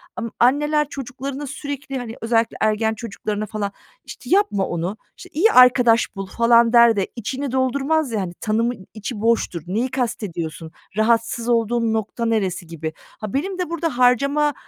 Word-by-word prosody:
amm, 230 Hz, -1 st, -4 dB
anneler 295 Hz, +4 st, +3 dB
çocuklarına 270 Hz, +2 st, -6 dB
sürekli, 280 Hz, -1 st, -5 dB
hani, 235 Hz, -2 st, -6 dB
özellikle 225 Hz, 0 st, +1 dB
ergen 220 Hz, +1 st, +2 dB
çocuklarına 215 Hz, -1 st, -4 dB
falan, 205 Hz, -1 st, -4 dB, 0.3 s
işte, -, -, -10 dB
"Yapma 380 Hz, -, +2 dB
onu, 175 Hz, +5 st, -3 dB, 0.2 s
işte, -, -, -12 dB
iyi 400 Hz, +9 st, +4 dB
arkadaş 245 Hz, -, +5 dB
bul." 195 Hz, -1 st, -5 dB
falan 235 Hz, +3 st, +4 dB
der 235 Hz, -2 st, +7 dB
de, 195 Hz, -, 0 dB
içini 260 Hz, +4 st, -4 dB
doldurmaz 270 Hz, +2 st, 0 dB
ya, 210 Hz, -3 st, -1 dB
hani, 175 Hz, -2 st, -5 dB
tanımın 220 Hz, -2 st, -1 dB
içi 215 Hz, 0 st, -6 dB
boştur, 225 Hz, -7 st, +1 dB
"Neyi 235 Hz, +7 st, -1 dB
kastediyorsun, 175 Hz, -10 st, -4 dB, 0.3 s
rahatsız 230 Hz, +1 st, +1 dB
olduğun 230 Hz, -1 st, +1 dB
nokta 220 Hz, +2 st, -2 dB
neresi?" 190 Hz, -6 st, -1 dB
gibi. 160 Hz, -1 st, -5 dB, 0.3 s
Ha, 210 Hz, -2 st, -5 dB
benim 370 Hz, +7 st, -2 dB
de 360 Hz, -, -2 dB
burada 330 Hz, -6 st, -2 dB
harcama 280 Hz, +4 st, +3 dB
235 Hz, 155 wpm, -21 LUFS, 215-270 Hz, 0.3 s, der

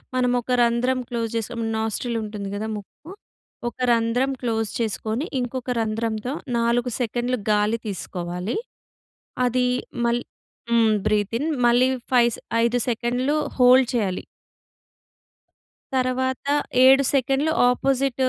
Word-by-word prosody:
మనమొక 250 Hz, 0 st, +1 dB
రంధ్రం 240 Hz, +2 st, +1 dB
క్లోజ్ 230 Hz, -2 st, -2 dB
చేసుకొని, 230 Hz, +1 st, -3 dB
నాస్ట్రిల్ 225 Hz, +2 st, -2 dB
ఉంటుంది 210 Hz, -2 st, -5 dB
కదా 215 Hz, +2 st, -3 dB
ముక్కు. 210 Hz, -, -11 dB, 0.6 s
ఒక -, -, -21 dB
రంధ్రం 235 Hz, +3 st, +1 dB
క్లోజ్ 225 Hz, -3 st, -1 dB
చేసుకొని, 220 Hz, -, -2 dB
ఇంకొక 250 Hz, 0 st, -3 dB
రంధ్రంతో 225 Hz, +2 st, -2 dB, 0.2 s
4 235 Hz, +1 st, +1 dB
సెకండ్‌లు 245 Hz, +2 st, -1 dB
గాలి 210 Hz, +2 st, +2 dB
తీసుకోవాలి. 180 Hz, 0 st, -4 dB, 0.9 s
అది 250 Hz, +1 st, +1 dB, 0.4 s
మళ్ 235 Hz, +1 st, +1 dB, 0.5 s
హ్మ్, 230 Hz, -2 st, +4 dB, 0.2 s
బ్రీత్ 210 Hz, 0 st, 0 dB
ఇన్ 295 Hz, -, -1 dB, 0.2 s
మళ్ళీ 245 Hz, +2 st, +4 dB, 0.2 s
5 240 Hz, -1 st, +5 dB
స్ -, -, -12 dB, 0.2 s
5 235 Hz, +1 st, +2 dB
సెకండ్‌లు 245 Hz, +4 st, 0 dB, 0.2 s
హోల్డ్ 250 Hz, 0 st, +6 dB
చేయాలి. 200 Hz, -6 st, -1 dB, 1.7 s
తర్వాత 260 Hz, +1 st, -1 dB, 0.4 s
7 270 Hz, +1 st, +7 dB
సెకన్లు 275 Hz, +3 st, +1 dB, 0.2 s
ఆపొజిట్టు 265 Hz, 0 st, +1 dB
240 Hz, 110 wpm, -23 LUFS, 220-255 Hz, 1.7 s, 7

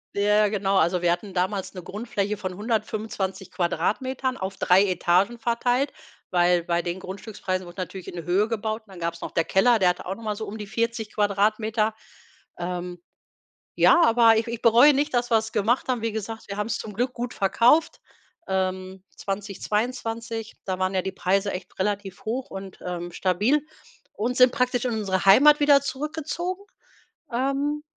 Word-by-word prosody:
Ja 210 Hz, +1 st, +3 dB
genau, 200 Hz, -1 st, 0 dB
also 175 Hz, +1 st, +2 dB
wir 175 Hz, -1 st, +3 dB
hatten 185 Hz, +2 st, -3 dB
damals 190 Hz, +2 st, -1 dB
'ne 180 Hz, -2 st, -8 dB
Grundfläche 210 Hz, 0 st, -3 dB
von 185 Hz, -1 st, -5 dB
125 210 Hz, -3 st, -3 dB
Quadratmetern 250 Hz, +9 st, -1 dB
auf 190 Hz, +1 st, -5 dB
3 185 Hz, +2 st, +5 dB
Etagen 185 Hz, +5 st, +2 dB
verteilt, 245 Hz, +4 st, 0 dB, 0.4 s
weil 175 Hz, -1 st, +3 dB
bei 170 Hz, 0 st, 0 dB
den 175 Hz, +2 st, -4 dB
Grundstückspreisen 185 Hz, -1 st, -5 dB
wurde 175 Hz, +2 st, -7 dB
natürlich 185 Hz, +1 st, -7 dB
in -, -, -7 dB
die 170 Hz, -, -5 dB
Höhe 190 Hz, +6 st, +2 dB
gebaut 220 Hz, 0 st, -3 dB
und -, -, -29 dB
dann 180 Hz, -, -11 dB
gab's 170 Hz, 0 st, -3 dB
noch -, -, -5 dB
der 165 Hz, -, +1 dB
Keller, 220 Hz, +7 st, +3 dB
der 185 Hz, -2 st, +4 dB
hatte 180 Hz, -, -3 dB
auch 190 Hz, -, -3 dB
noch 230 Hz, -, -12 dB
mal 210 Hz, -1 st, -2 dB
so 220 Hz, +1 st, -5 dB
um 210 Hz, -, -6 dB
die 210 Hz, -, -6 dB
40 230 Hz, 0 st, -2 dB
Quadratmeter. 215 Hz, +2 st, +1 dB, 0.6 s
Ähm, 175 Hz, 0 st, -5 dB, 0.8 s
ja, 345 Hz, -, +6 dB
aber 230 Hz, -5 st, +5 dB
ich 225 Hz, -, 0 dB
ich 235 Hz, -1 st, -5 dB
bereue 240 Hz, +6 st, +7 dB
nicht, 290 Hz, +1 st, 0 dB
dass 245 Hz, 0 st, +1 dB
wir's 220 Hz, -1 st, +1 dB
gemacht 225 Hz, +6 st, +1 dB
haben. 250 Hz, -3 st, -1 dB
Wie 225 Hz, -1 st, -1 dB
gesagt, 220 Hz, 0 st, -6 dB
wir 200 Hz, -, -5 dB
haben's 210 Hz, 0 st, -1 dB
zum 215 Hz, -, -7 dB
Glück 245 Hz, +4 st, -1 dB
gut 245 Hz, 0 st, -4 dB
verkauft, 240 Hz, +11 st, +3 dB, 0.5 s
ähm, 185 Hz, 0 st, -2 dB
2022, 225 Hz, +3 st, -3 dB
da 185 Hz, -1 st, -2 dB
waren 185 Hz, +1 st, 0 dB
ja 185 Hz, -, +1 dB
die 190 Hz, -, -4 dB
Preise 195 Hz, +2 st, 0 dB
echt 185 Hz, -, -8 dB
relativ 200 Hz, 0 st, -3 dB
hoch 250 Hz, +4 st, -3 dB
und, 195 Hz, -1 st, -8 dB
ähm, 175 Hz, -1 st, -5 dB
stabil 210 Hz, -, +1 dB, 0.5 s
und 245 Hz, +4 st, -2 dB
sind 250 Hz, 0 st, +7 dB
praktisch 250 Hz, -2 st, 0 dB
in 245 Hz, -, -1 dB
unsere 195 Hz, -4 st, -1 dB
Heimat 290 Hz, +10 st, +7 dB
wieder 285 Hz, -1 st, +6 dB
zurückgezogen, 315 Hz, +7 st, -4 dB, 0.7 s
ähm, 275 Hz, +4 st, -1 dB
210 Hz, 175 wpm, -25 LUFS, 190-235 Hz, 0.8 s, bereue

